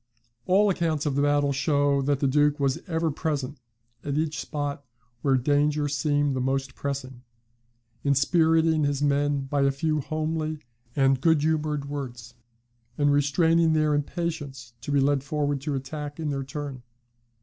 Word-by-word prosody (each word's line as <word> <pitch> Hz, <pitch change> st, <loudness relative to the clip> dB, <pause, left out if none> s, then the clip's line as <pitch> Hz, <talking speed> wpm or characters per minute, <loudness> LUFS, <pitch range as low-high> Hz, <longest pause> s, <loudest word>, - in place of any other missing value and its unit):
'" 120 Hz, 0 st, -45 dB
All 200 Hz, +3 st, +4 dB
accounts 160 Hz, -4 st, -1 dB
of 145 Hz, -, 0 dB
the 140 Hz, -, +1 dB
battle 145 Hz, -1 st, +2 dB
show 140 Hz, 0 st, +2 dB
that 140 Hz, 0 st, 0 dB
the 140 Hz, -, +3 dB
Duke 145 Hz, +2 st, +2 dB
was 135 Hz, -1 st, +1 dB
ever 165 Hz, -2 st, 0 dB
present 140 Hz, -4 st, -3 dB, 0.4 s
at 145 Hz, 0 st, -2 dB
each 155 Hz, 0 st, -1 dB
spot 145 Hz, -1 st, -4 dB, 0.4 s
where 135 Hz, -2 st, +3 dB
danger 145 Hz, +3 st, +1 dB
seemed 145 Hz, -1 st, 0 dB
the 130 Hz, -, -1 dB
most 135 Hz, 0 st, -1 dB
pressing; 130 Hz, -3 st, -5 dB, 0.8 s
inspiriting 160 Hz, +2 st, +3 dB
his 145 Hz, 0 st, 0 dB
men 145 Hz, 0 st, +1 dB
by 140 Hz, +1 st, -1 dB
a 140 Hz, -, +4 dB
few 155 Hz, +3 st, 0 dB
homely 155 Hz, +1 st, -2 dB, 0.4 s
and 135 Hz, -2 st, +3 dB
good 160 Hz, -1 st, +3 dB
humoured 155 Hz, -2 st, 0 dB
words; 125 Hz, -5 st, -6 dB, 0.6 s
and 145 Hz, -1 st, +3 dB
restraining 160 Hz, +3 st, +3 dB
their 155 Hz, -1 st, +2 dB
impatience 145 Hz, -5 st, -3 dB
to 135 Hz, -, -5 dB
be 145 Hz, -, +3 dB
led 135 Hz, 0 st, +2 dB
forward 145 Hz, -1 st, -1 dB
to 145 Hz, 0 st, -2 dB
attack 145 Hz, +3 st, -6 dB
in 155 Hz, -2 st, -2 dB
their 135 Hz, -1 st, -2 dB
turn. 135 Hz, -1 st, -6 dB
145 Hz, 160 wpm, -26 LUFS, 140-155 Hz, 0.8 s, All